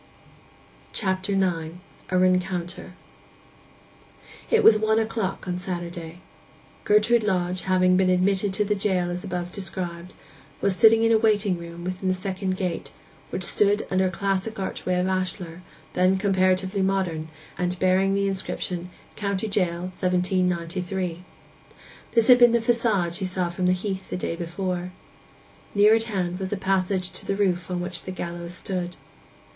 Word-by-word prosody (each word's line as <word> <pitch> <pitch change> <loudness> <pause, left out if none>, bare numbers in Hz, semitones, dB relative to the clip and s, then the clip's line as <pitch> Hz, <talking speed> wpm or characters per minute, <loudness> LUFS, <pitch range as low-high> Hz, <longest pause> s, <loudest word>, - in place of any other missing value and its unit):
CHAPTER 190 -1 -1
IX—A 180 0 -2
RENCOUNTER 180 -1 0 1.6
It 455 - +4
was 220 - +8
one 220 0 +2
o'clock 220 -4 -2
on 180 0 -2
Saturday. 175 -1 -6 0.6
Gertrude 215 +3 +4
Lodge, 185 -3 0
having 185 -1 +3
been 185 -1 +3
admitted 190 +2 +2
to 210 - +1
the 210 - +1
jail 190 -3 0
as 180 +1 -4
above 180 -2 -4
described, 180 -2 -5 0.5
was 200 -2 +1
sitting 225 +4 +6
in 225 - +4
a 225 - +5
waiting 205 -4 +2
room 170 0 -9
within 185 +1 -3
the 185 - +2
second 185 0 -3
gate, 180 -3 -3 0.4
which 185 - -3
stood 205 +3 +3
under 185 0 +3
a - - 0
classic 195 +3 -2
archway 185 -1 -2
of 180 - +1
ashlar, 185 -2 -2 0.3
then 185 +1 +3
comparatively 190 0 +1
modern, 185 -5 0 0.3
and 180 0 -1
bearing 190 +1 +2
the 200 0 +1
inscription, 185 -2 -3 0.3
'COVNTY 200 0 -2
JAIL: 175 -4 0
1793.' 180 -1 -1 0.9
This 230 -2 +3
had 250 -1 +8
been 240 -1 +7
the - - +5
façade 225 -7 +1
she 195 - -2
saw 185 -1 -1
from 180 +1 -1
the - - +4
heath 190 +1 -4
the - - -3
day 175 - -3
before. 180 +1 -4 0.8
Near 205 +2 +6
at 225 0 +2
hand 185 -5 -2
was 190 -1 -3
a 205 - -1
passage 190 -1 0
to - - -11
the 195 - -1
roof 185 -3 0
on 180 -1 -2
which 180 0 -3
the 185 - -6
gallows 175 -1 -5
stood. 180 -2 -3
185 Hz, 150 wpm, -25 LUFS, 180-200 Hz, 1.6 s, was